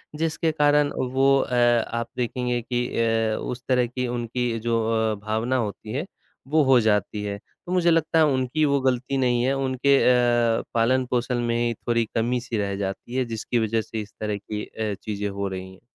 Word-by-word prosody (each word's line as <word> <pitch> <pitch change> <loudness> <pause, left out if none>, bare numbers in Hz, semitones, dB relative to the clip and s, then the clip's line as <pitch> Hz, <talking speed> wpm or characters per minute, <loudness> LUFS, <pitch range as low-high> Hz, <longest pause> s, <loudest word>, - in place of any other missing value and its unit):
जिसके 160 +1 0
कारण 145 -1 +3 0.2
वो 135 +1 +4
अ, 125 - -1
आप 120 -1 +2
देखेंगे 125 0 -1
कि 120 +1 -2
अ, 115 -1 +1
उस 125 0 -5
तरह 125 -2 +2
की 125 +1 -3
उनकी 120 -1 -2
जो 115 0 0 0.3
अ, - - -2
भावना 110 +4 0
होती 110 -1 -4
है 145 +6 -2 0.4
वो 155 +1 +3
हो 130 -2 +5
जाती 105 -1 0
है। 100 0 -3 0.3
तो 180 - -6
मुझे 175 -2 +3
लगता 165 0 +2
है 160 - +6
उनकी 135 +1 0
वो 140 -1 +2
गलती 130 +1 0
नहीं 120 -2 +2
है 130 +2 +2
उनके 135 +1 +2
अ, 120 -2 +3
पालन-पोषण 125 +1 +1
में 115 - 0
ही 120 0 0
थोड़ी 115 +1 -1
कमी 120 +2 +1
सी 120 -2 -4
रह 100 -1 -1
जाती 100 +5 -5
है 130 -1 +1
जिसकी 115 +1 -2
वज़ह 110 0 +1
से 110 0 -5
इस 105 -1 -11
तरह 105 -1 -2
की 105 +1 -6
अ, 110 -2 -4
चीज़ें 105 -1 -2
हो 100 0 -3
रही 95 0 -7
हैं। 95 - -18
120 Hz, 195 wpm, -24 LUFS, 110-130 Hz, 0.4 s, है